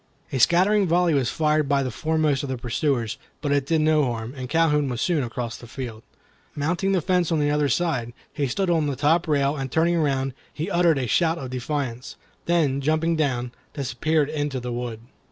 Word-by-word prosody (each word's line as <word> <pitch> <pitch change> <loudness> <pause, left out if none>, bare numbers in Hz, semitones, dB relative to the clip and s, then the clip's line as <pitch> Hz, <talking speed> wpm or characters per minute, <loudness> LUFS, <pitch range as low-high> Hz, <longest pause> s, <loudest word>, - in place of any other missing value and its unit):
A 135 - -1
scattering 190 - +4
volley 175 0 +3
was 135 -4 +1
fired 155 -1 +1
by 140 -1 +2
the 130 - -3
foremost 155 0 0
of 140 - -5
the 130 - -2
pursuers, 120 0 -1 0.2
but 145 -2 -2
it 140 -1 +1
did 160 0 +2
no 155 -1 +3
harm, 115 0 -4
and 130 -2 -6
Calhoun 150 -2 +2
was 120 -2 -3
soon 160 -2 +1
across 120 -1 -4
the 120 - -12
field. 115 -3 -7 0.5
Mounting 175 +6 0
the 190 -3 +2
fence 180 -2 +1
on 160 - +2
the 145 0 +2
other 150 -1 +1
side, 130 -6 0 0.2
he 145 -2 -1
stood 180 +8 0
on 160 -3 +2
the 140 - -1
top 160 +6 +2
rail, 140 -1 +2
and 135 -3 -4
turning 170 +3 +2
around, 135 -4 0 0.2
he 155 - -4
uttered 170 -3 +3
a 130 - -1
shout 165 +7 +2
of 130 -5 -6
defiance, 130 -1 -4 0.3
then 150 -6 +2
jumping 155 +3 +1
down, 125 -6 -1 0.2
disappeared 145 +3 0
in 150 -1 -1
the 125 -3 -4
wood. 120 -2 -4
145 Hz, 205 wpm, -24 LUFS, 130-160 Hz, 0.5 s, scattering